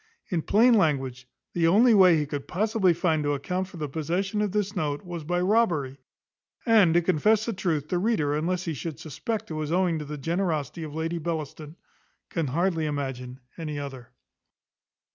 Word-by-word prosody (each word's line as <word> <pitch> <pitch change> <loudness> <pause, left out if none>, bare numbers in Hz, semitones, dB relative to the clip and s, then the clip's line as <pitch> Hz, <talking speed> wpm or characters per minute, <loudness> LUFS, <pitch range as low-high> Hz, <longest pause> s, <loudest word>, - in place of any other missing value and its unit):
In 175 -4 0
plain 230 +9 +4
language, 135 - +1 0.3
the 170 -1 +2
only 225 +7 +5
way 185 -5 +6
he 150 - 0
could 145 -1 -5
possibly 205 0 +2
find 165 -2 +1
to 145 0 0
account 180 +7 -3
for 185 - -12
the 150 -2 -3
possession 175 +8 -2
of 210 -2 0
this 205 0 -1
note, 150 -3 -2
was 175 -2 -6
by 175 +3 -1
robbery: 180 - +1 0.7
and, 210 -8 +5
to 175 - +4
confess 205 +6 +2
the 230 - -2
truth, 160 -6 -2
the 180 - 0
reader, 185 -9 +1
unless 175 +4 -1
he 165 - -2
should 155 +2 -5
suspect 210 - -4
it - - -2
was 155 0 -3
owing 175 -2 +1
to 150 - -6
the 150 +1 -6
generosity 165 0 -2
of 155 -2 -6
Lady 165 +1 -2
Bellaston, 155 -1 -5 0.6
can 165 -4 -1
hardly 165 +3 0
imagine 130 -3 -4 0.2
any 155 -3 -4
other. 135 -4 -7
165 Hz, 180 wpm, -26 LUFS, 150-185 Hz, 0.7 s, way